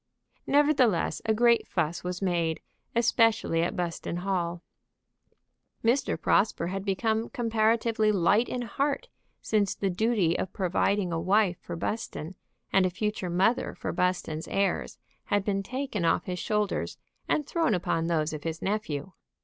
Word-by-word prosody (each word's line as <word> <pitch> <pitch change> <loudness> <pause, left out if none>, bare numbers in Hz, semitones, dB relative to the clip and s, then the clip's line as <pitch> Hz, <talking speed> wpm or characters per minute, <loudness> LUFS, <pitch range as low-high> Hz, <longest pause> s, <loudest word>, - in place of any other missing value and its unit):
Nevertheless, 280 - +3
a 220 - +3
great 235 +1 +4
fuss 170 -2 -1
was 180 +1 -4
made, 170 -3 0 0.4
especially 225 -7 +3
at 170 - -1
Buston 170 -1 -3
Hall. 175 -2 -2 1.2
Mr. 240 +4 +1
Prosper 185 -4 +2
had 195 +1 -3
become 220 +3 0
comparatively 225 -1 +2
light 205 +4 +3
in 250 -1 -2
heart 285 - -1 0.3
since 205 -3 +1
the 195 -2 -1
duty 195 -3 +1
of 190 - -3
providing 185 -1 0
a 165 - 0
wife 190 0 +2
for 175 - -6
Buston, 175 -2 -4 0.4
and 190 -1 +5
a - - -1
future 205 0 -2
mother 190 +7 +1
for - - -4
Buston's 175 -3 -1
heirs, 195 -2 -1 0.3
had 205 -1 0
been 195 -1 0
taken 255 -2 -3
off 165 - +2
his 180 -1 -4
shoulders 210 -2 -1 0.3
and 300 - +1
thrown 325 - +1
upon 165 -2 -1
those 160 -2 0
of 155 - -5
his 165 0 -4
nephew. 190 -6 -2
195 Hz, 145 wpm, -28 LUFS, 175-225 Hz, 1.2 s, and